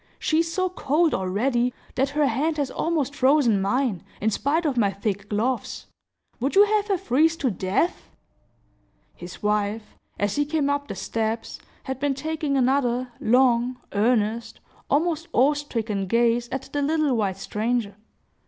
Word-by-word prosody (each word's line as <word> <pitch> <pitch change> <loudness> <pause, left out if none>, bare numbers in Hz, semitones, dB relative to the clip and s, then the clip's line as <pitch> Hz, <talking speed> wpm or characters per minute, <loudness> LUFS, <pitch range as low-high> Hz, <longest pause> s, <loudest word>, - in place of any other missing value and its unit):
She 315 - +1
is 330 0 0
so 370 +2 0
cold, 330 -2 +1
already, 240 +6 0 0.2
that 270 +1 +1
her 295 +1 +1
hand 290 +6 0
has 280 -3 -1
almost 305 -5 -1
frozen 260 -7 +3
mine, 210 -2 0 0.2
in 220 +2 +1
spite 310 +10 0
of 285 -4 +1
my 215 -5 +3
thick 200 +1 -4
gloves. 235 +5 -2 0.5
Would 270 +8 -1
you 405 +1 +8
have 420 0 +1
her 395 -2 +1
freeze 315 +3 +2
to 265 -6 0
death?" 195 - -1 1.0
His 175 +3 -11
wife, 210 +1 -1 0.2
as 205 +3 -1
he 290 - +3
came 295 -1 0
up 285 0 -2
the - - -5
steps, 225 0 -3 0.2
had 265 -1 -5
been 280 0 0
taking 310 -1 -2
another 255 -1 +1
long, 250 +1 +2
earnest, 225 +1 0 0.3
almost 325 +2 +1
awe 270 +5 +4
stricken 225 -9 -3
gaze 235 +2 +2
at 265 0 -6
the 290 - 0
little 300 -2 +1
white 200 -4 -1
stranger. 215 +1 -2
255 Hz, 155 wpm, -24 LUFS, 220-290 Hz, 1.0 s, you